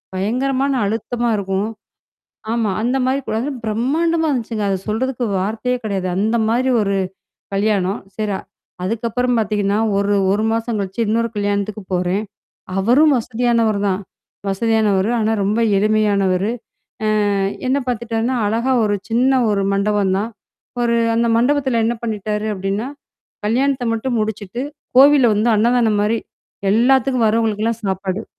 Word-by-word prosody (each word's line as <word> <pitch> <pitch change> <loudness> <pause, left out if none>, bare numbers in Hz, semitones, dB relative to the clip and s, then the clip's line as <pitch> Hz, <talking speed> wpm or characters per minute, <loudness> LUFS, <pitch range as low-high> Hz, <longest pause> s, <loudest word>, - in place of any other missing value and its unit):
பயங்கரமான 260 +7 0
அழுத்தமா 235 +3 -2
இருக்கும். 195 +2 -1 0.8
ஆமா. 230 -3 0
அந்த 250 +3 +1
மாரி 265 +2 +1
கூட. 220 - -1
அன 290 - -3
பிரம்மாண்டமா 315 +9 +1
இருந்துச்சுங்க. 230 -5 -2
அத - - +1
சொல்றதுக்கு 245 +3 -1 0.2
வார்த்தையே 225 +5 -1
கிடையாது. 195 -3 -2
அந்த 220 +3 +1
மாதிரி 255 +3 +1
ஒரு 200 -1 0 0.6
கல்யாணம். 200 -1 +1 0.2
சரி. 210 -3 -1 0.5
அதுக்கப்புறம் 235 +4 0
பார்த்தீங்கன்னா, 205 -1 0 0.2
ஒரு 200 0 +1 0.2
ஒரு 210 +2 +1
மாசம் 230 -1 -1
கழிச்சு 195 +3 -4
இன்னொரு 230 +2 +1
கல்யாணத்துக்கு 205 +1 -1
போறேன். 180 +3 0 0.5
அவரும் 265 +9 +4
வசதியானவர் 230 -2 +1
தான். 190 0 0 0.5
வசதியானவரு. 210 -1 +1
ஆனா 220 +1 +1
ரொம்ப 210 +4 +1 0.2
எளிமையானவரு. 200 -2 +2 0.8
அ - - +1 0.3
என்ன 265 +2 +2
பார்த்தட்டான்னா 235 +1 -1
அழகா 235 +5 +1
ஒரு 205 -1 +1
சின்ன 255 +3 +3
ஒரு 200 -1 +1
மண்டபம் 200 -1 +1
தான். 220 +4 -2 0.5
ஒரு 235 -1 +2 0.2
அந்த 235 +1 +2
மண்டபத்துல 260 -2 +2
என்ன 235 +1 0
பண்ணிட்டாரு 215 -1 -2
அப்படின்னா? 195 +5 -2 0.6
கல்யாணத்த 260 +4 +1
மட்டும் 235 +2 -1
முடிச்சுட்டு 215 +1 -3 0.4
கோவில்ல 275 -3 +7
வந்து 220 +3 +2
அன்னதானம் 225 -1 +2
மாரி. 220 +2 +1 0.5
எல்லாத்துக்கும் 250 +1 +3
வர்றவங்களுக்கெல்லாம் 225 0 0
சாப்பாடு. 190 +2 -2
220 Hz, 125 wpm, -19 LUFS, 205-245 Hz, 0.8 s, கோவில்ல